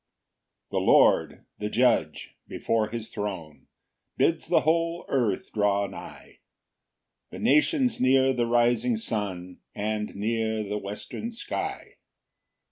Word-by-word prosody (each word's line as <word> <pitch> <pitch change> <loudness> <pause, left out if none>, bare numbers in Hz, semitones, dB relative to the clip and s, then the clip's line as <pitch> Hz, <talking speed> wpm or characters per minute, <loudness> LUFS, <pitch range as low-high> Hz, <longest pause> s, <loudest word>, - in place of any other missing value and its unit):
1 - - -1
The - - -2
Lord, - - +4
the 105 - -3
Judge, 115 -10 +1
before 110 -2 -1
his 115 0 -6
throne, 95 -8 -6 0.5
Bids - - +1
the - - +3
whole 165 +2 0
earth 115 -8 -1
draw 100 -1 +2
nigh, 95 - -11 0.9
The - - -9
nations 245 - +2
near 130 +1 +4
the 120 -2 0
rising 120 0 +2
sun, 95 -5 -4 0.2
And 105 0 -3
near 110 +1 -1
the 105 0 -3
western 105 - -6
sky. 230 - -5
110 Hz, 120 wpm, -26 LUFS, 105-130 Hz, 0.9 s, Lord